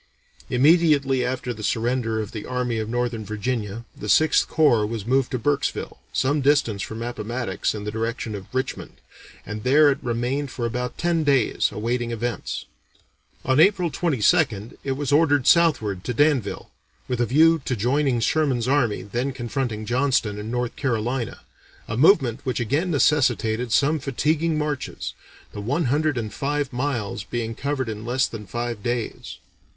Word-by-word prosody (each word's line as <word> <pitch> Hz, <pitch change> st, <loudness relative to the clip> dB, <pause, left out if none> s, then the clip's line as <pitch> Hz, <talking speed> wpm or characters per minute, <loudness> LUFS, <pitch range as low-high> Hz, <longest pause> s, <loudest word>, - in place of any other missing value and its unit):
Immediately 140 Hz, -2 st, +4 dB
after 125 Hz, 0 st, -2 dB
the 110 Hz, -, -10 dB
surrender 115 Hz, +1 st, 0 dB
of 105 Hz, -, -6 dB
the 105 Hz, -, -7 dB
Army 125 Hz, -2 st, -1 dB
of 110 Hz, 0 st, -3 dB
Northern 120 Hz, -2 st, -2 dB
Virginia, 110 Hz, +1 st, -3 dB
the 105 Hz, -, -6 dB
Sixth 155 Hz, +6 st, +4 dB
Corps 145 Hz, -9 st, +3 dB
was 105 Hz, -1 st, -4 dB
moved 130 Hz, +1 st, +2 dB
to 130 Hz, -, -2 dB
Burkesville, 140 Hz, +4 st, -1 dB
some 145 Hz, +3 st, +1 dB
distance 135 Hz, -8 st, +2 dB
from 110 Hz, +2 st, -5 dB
Appomattox 115 Hz, -3 st, -3 dB
in 105 Hz, -, -5 dB
the 105 Hz, -, -3 dB
direction 115 Hz, 0 st, -3 dB
of 100 Hz, -2 st, -7 dB
Richmond, 130 Hz, +1 st, -3 dB, 0.5 s
and 105 Hz, 0 st, -6 dB
there 145 Hz, +3 st, +5 dB
it 140 Hz, -, -2 dB
remained 125 Hz, +4 st, -2 dB
for 120 Hz, -1 st, -4 dB
about 125 Hz, +1 st, -3 dB
ten 170 Hz, -2 st, +1 dB
days 135 Hz, -6 st, +2 dB
awaiting 120 Hz, +2 st, -2 dB
events. 120 Hz, -1 st, -3 dB, 0.8 s
On 130 Hz, +2 st, +2 dB
April 180 Hz, -1 st, +4 dB
22nd 115 Hz, -, +1 dB
it 135 Hz, -, -1 dB
was 140 Hz, +1 st, -3 dB
ordered 145 Hz, -3 st, +3 dB
southward 110 Hz, -, +3 dB
to 125 Hz, -, -2 dB
Danville, 145 Hz, -7 st, +1 dB, 0.4 s
with 125 Hz, -1 st, -1 dB
a 120 Hz, -, +1 dB
view 160 Hz, +5 st, +4 dB
to 125 Hz, -, -1 dB
joining 125 Hz, +3 st, +1 dB
Sherman's 130 Hz, -3 st, +1 dB
army 130 Hz, -6 st, +1 dB
then 120 Hz, +6 st, -2 dB
confronting 120 Hz, -3 st, -3 dB
Johnston 120 Hz, -4 st, +1 dB
in 105 Hz, +1 st, -6 dB
North 125 Hz, 0 st, -2 dB
Carolina, 120 Hz, -2 st, -2 dB, 0.5 s
a -, -, -3 dB
movement 130 Hz, -, +4 dB
which 130 Hz, -2 st, -2 dB
again 145 Hz, -, 0 dB
necessitated 125 Hz, -6 st, +2 dB
some 150 Hz, +6 st, +3 dB
fatiguing 155 Hz, +4 st, 0 dB
marches, 150 Hz, -2 st, -3 dB, 0.4 s
the 105 Hz, -, -6 dB
one 140 Hz, +10 st, 0 dB
hundred 155 Hz, -2 st, +1 dB
and 110 Hz, -3 st, -4 dB
five 145 Hz, 0 st, -2 dB
miles 120 Hz, -7 st, -2 dB
being 115 Hz, +1 st, -3 dB
covered 135 Hz, +1 st, -2 dB
in 110 Hz, -1 st, -5 dB
less 125 Hz, +3 st, +1 dB
than 105 Hz, -3 st, -7 dB
five 120 Hz, -2 st, -4 dB
days. 120 Hz, 0 st, -4 dB
125 Hz, 160 wpm, -23 LUFS, 115-145 Hz, 0.8 s, there